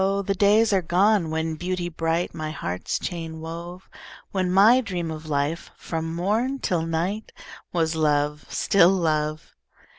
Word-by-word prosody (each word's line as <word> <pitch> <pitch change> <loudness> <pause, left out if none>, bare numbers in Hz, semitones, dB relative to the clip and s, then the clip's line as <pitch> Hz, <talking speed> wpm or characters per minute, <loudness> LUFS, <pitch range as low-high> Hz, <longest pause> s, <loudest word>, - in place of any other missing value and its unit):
the 195 - +1
days 210 +3 +4
are 190 - +3
gone, 185 +1 +2
when 160 0 -1
Beauty 175 +2 -3
bright 165 +1 -1
My 155 0 -4
heart's 90 - -3
chain 165 -3 -5
wove; 170 +3 -8 0.4
When 185 -2 0
my 215 +7 +6
dream 175 -6 -3
of 155 0 -8
life, 145 +3 -1
from 165 0 -4
morn 220 +10 0
till 175 -10 -1
night, 175 +7 -2 0.4
Was 165 -2 0
love, 150 -1 +1
still 190 -3 +4
love. 155 -4 -1
170 Hz, 145 wpm, -24 LUFS, 160-190 Hz, 0.4 s, my